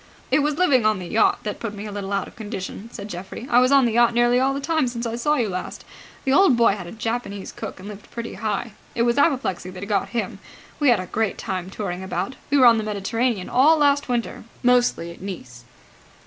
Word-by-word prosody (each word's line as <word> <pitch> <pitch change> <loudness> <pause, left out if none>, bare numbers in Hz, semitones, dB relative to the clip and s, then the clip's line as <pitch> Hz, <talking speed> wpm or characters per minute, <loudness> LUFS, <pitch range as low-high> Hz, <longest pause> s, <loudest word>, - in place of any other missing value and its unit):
"It - - +4
was 295 0 0
living 285 -9 +4
on 215 -1 +3
the 185 - -6
yacht 215 +6 +2
that 210 -2 -4
put 215 -2 -5
me 205 +1 -7
a 210 - -6
little 200 -1 -5
out 200 -1 -1
of - - -15
condition," 210 -1 -6
said 205 -3 -7
Geoffrey. 190 +4 -7
"I 240 - +6
was 255 +1 +3
on 275 -2 +6
the 235 - +1
yacht 235 +1 +3
nearly 240 +1 +4
all 265 +1 +2
the - - -2
time 300 0 +1
since 240 0 -4
I 230 0 -2
saw 295 +6 +1
you 240 -6 +1
last. 185 -2 -5 0.4
The 265 - +1
old 285 -6 +5
boy 235 -2 +5
had 185 -4 -7
a - - -8
Japanese 225 -3 -4
cook - - -7
and 190 - -9
lived 210 -1 -10
pretty 235 -1 -6
high. 225 +1 -3 0.2
It 235 - +2
was 235 +3 +2
apoplexy 250 - +1
that 185 +1 -7
got 200 -2 0
him. 235 -1 -3 0.4
We 290 -3 +4
had 235 - +4
a 185 - -4
great 215 +2 -1
time 185 -3 -4
touring 190 -3 -4
about. 190 +6 -3
We 285 - +3
were 260 - +6
on 230 -2 +7
the - - -2
Mediterranean 215 0 -1
all 300 +6 +5
last 285 -2 +2
winter, 240 -2 -2 0.2
mostly 245 -9 +2
at 170 - -13
Nice." 130 -11 -8
230 Hz, 240 wpm, -23 LUFS, 195-250 Hz, 0.4 s, on